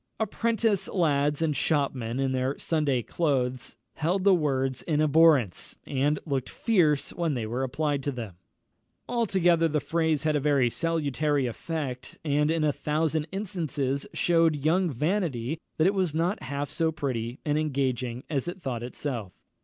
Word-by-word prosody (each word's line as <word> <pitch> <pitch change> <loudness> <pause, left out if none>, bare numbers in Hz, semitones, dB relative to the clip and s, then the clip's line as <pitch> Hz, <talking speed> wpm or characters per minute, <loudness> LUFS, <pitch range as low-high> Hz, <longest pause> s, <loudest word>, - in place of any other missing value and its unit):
Apprentice 225 -2 0
lads 150 -3 +1
and 155 -2 +1
shopmen 135 -5 0
in 135 -1 +1
their 130 +1 -1
Sunday 145 -7 0
clothes 130 -6 -1 0.2
held 175 +5 0
the 200 -1 +6
words 135 -6 0
in 150 -3 0
abhorrence, 155 - +4
and 145 +2 +1
looked 135 -4 -2
fierce 165 -11 +1
when 165 -4 -1
they 115 -3 -2
were 120 +4 -2
applied 140 +2 -1
to 145 - -2
them. 115 -7 -6 0.7
Altogether 185 -8 +2
the 155 -1 0
phrase 160 0 0
had 155 -1 +1
a - - +3
very 140 -4 +2
salutary 150 -3 0
effect, 130 +1 -5
and 150 0 +2
in 165 -1 +1
a 150 -1 +2
thousand 155 +1 -1
instances 155 -9 -2
shewed 165 -4 +2
young 175 +3 +3
Vanity 150 - -1 0.2
that 155 - +3
it 195 - +4
was 185 -6 0
not 170 +5 0
half 140 +2 -3
so 160 -1 0
pretty 125 -6 -3
and 150 0 +1
engaging 130 -5 -1
as 145 0 -2
it 180 +2 -5
thought 130 -8 -4
itself. 120 -4 -4
150 Hz, 155 wpm, -27 LUFS, 130-165 Hz, 0.7 s, the